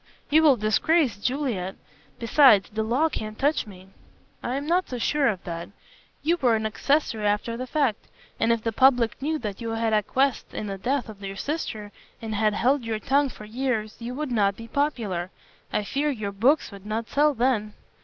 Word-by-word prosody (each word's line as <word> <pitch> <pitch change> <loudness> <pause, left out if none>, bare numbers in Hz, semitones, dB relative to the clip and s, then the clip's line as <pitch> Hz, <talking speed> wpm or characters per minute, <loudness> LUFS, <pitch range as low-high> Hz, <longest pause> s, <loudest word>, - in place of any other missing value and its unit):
"You 310 +2 +6
will 290 -5 +5
disgrace 235 +5 +2
Juliet. 225 -5 -2 0.4
Besides, 230 - +5
the 220 +1 -2
law 245 +9 +2
can't 215 -8 -5
touch 290 -3 +1
me." 190 -2 -13 0.5
"I 245 - -2
am 280 +1 -3
not 355 +4 +1
so 250 - -4
sure 280 +4 +1
of 195 -6 -1
that. 170 -1 -6 0.5
You 335 +3 +2
were 245 -7 +3
an 220 0 -2
accessory 220 -1 0
after 210 +3 0
the 255 +2 -5
fact. 265 -6 0 0.3
And 230 - +3
if 230 -1 0
the 225 - 0
public 245 0 +3
knew 310 +3 0
that 210 -5 -6
you 230 - -3
had 225 0 0
acquiesced 250 +5 0
in - - -3
the 195 -1 -5
death 255 +4 -1
of 210 -2 -11
your 195 0 -5
sister 220 -6 -4 0.3
and 220 -1 -5
had 210 0 +1
held 260 +3 +2
your 225 -1 -2
tongue 275 +6 +2
for 215 - -11
years, 220 -2 -2
you 240 +2 -5
would 300 -1 -3
not 200 -4 +2
be 230 - -9
popular. 220 - -1 0.4
I 210 - 0
fear 285 +8 -1
your 215 -7 -3
books 245 +10 +2
would 200 0 -11
not 220 +2 -2
sell 295 0 +2
then." 230 -4 0
230 Hz, 195 wpm, -25 LUFS, 210-275 Hz, 0.5 s, You